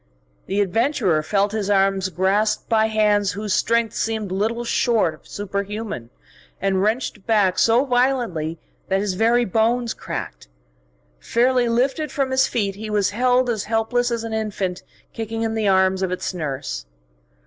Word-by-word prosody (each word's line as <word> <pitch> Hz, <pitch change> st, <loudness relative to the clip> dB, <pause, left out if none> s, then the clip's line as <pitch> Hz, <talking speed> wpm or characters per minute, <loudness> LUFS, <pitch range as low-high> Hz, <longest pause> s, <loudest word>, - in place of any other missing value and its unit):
The 200 Hz, +2 st, +1 dB
adventurer 205 Hz, -, +1 dB
felt 200 Hz, +5 st, +1 dB
his 210 Hz, -2 st, -2 dB
arms 195 Hz, -1 st, +2 dB
grasped 200 Hz, +5 st, +1 dB
by 220 Hz, -1 st, +3 dB
hands 210 Hz, -2 st, +2 dB
whose 205 Hz, 0 st, -2 dB
strength 230 Hz, 0 st, +1 dB
seemed 220 Hz, -3 st, -2 dB
little 220 Hz, +5 st, -1 dB
short 230 Hz, -7 st, +1 dB
of 155 Hz, -, -18 dB
superhuman, 200 Hz, -, -4 dB, 0.5 s
and 190 Hz, -1 st, +1 dB
wrenched 215 Hz, -1 st, -1 dB
back 205 Hz, -5 st, +3 dB
so 235 Hz, +4 st, +4 dB
violently 245 Hz, -, 0 dB, 0.3 s
that 190 Hz, 0 st, +1 dB
his 200 Hz, -1 st, -1 dB
very 235 Hz, +5 st, +3 dB
bones 230 Hz, +3 st, +1 dB
cracked. -, -, -6 dB, 0.7 s
Fairly 245 Hz, -, +2 dB
lifted 265 Hz, +6 st, 0 dB
from 275 Hz, -2 st, -1 dB
his 260 Hz, 0 st, +3 dB
feet, 200 Hz, -4 st, -1 dB
he 215 Hz, +2 st, -7 dB
was 205 Hz, -2 st, +1 dB
held 250 Hz, +3 st, +2 dB
as 220 Hz, -4 st, -1 dB
helpless 230 Hz, +2 st, 0 dB
as 235 Hz, -1 st, -2 dB
an 225 Hz, -1 st, -5 dB
infant 205 Hz, -4 st, -2 dB, 0.3 s
kicking 225 Hz, 0 st, -4 dB
in 225 Hz, 0 st, -1 dB
the 220 Hz, -2 st, 0 dB
arms 190 Hz, 0 st, +3 dB
of 190 Hz, -1 st, -1 dB
its 185 Hz, -, -3 dB
nurse. 135 Hz, -, -4 dB
215 Hz, 155 wpm, -22 LUFS, 195-235 Hz, 0.7 s, so